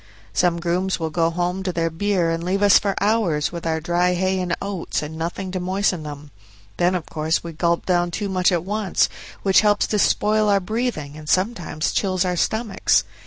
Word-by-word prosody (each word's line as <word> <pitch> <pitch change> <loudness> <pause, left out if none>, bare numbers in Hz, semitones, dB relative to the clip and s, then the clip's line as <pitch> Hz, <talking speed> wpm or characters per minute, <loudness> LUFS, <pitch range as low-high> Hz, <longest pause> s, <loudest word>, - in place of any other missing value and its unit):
Some 175 -1 +2
grooms 180 +3 -1
will 160 -1 -2
go 165 0 +2
home 175 +2 -2
to 190 -1 -2
their 165 -1 -1
beer 180 -1 0
and 165 0 -2
leave 190 +3 0
us 205 -1 +7
for 200 -1 -1
hours 200 -8 +1
with 170 -1 -5
our 160 0 0
dry 175 +2 +1
hay 185 +1 0
and 180 -2 -1
oats 195 -6 -3
and 150 +1 -6
nothing 175 +3 -4
to 185 - -2
moisten 185 -1 0
them; 150 -1 -8 0.5
then 180 +1 +2
of 175 - -3
course 155 +1 -1
we 170 -1 -7
gulp 170 +1 0
down 175 -1 +2
too 205 +4 -3
much 185 -1 +2
at 170 -2 0
once, 205 -1 +1 0.3
which 195 -1 +5
helps 205 -1 +3
to 210 - -1
spoil 215 +1 +2
our 200 -1 +4
breathing 195 - -3
and 155 -1 -9
sometimes 185 -5 0
chills 185 -2 0
our 180 -1 0
stomachs. 220 +3 +1
180 Hz, 205 wpm, -22 LUFS, 165-195 Hz, 0.5 s, us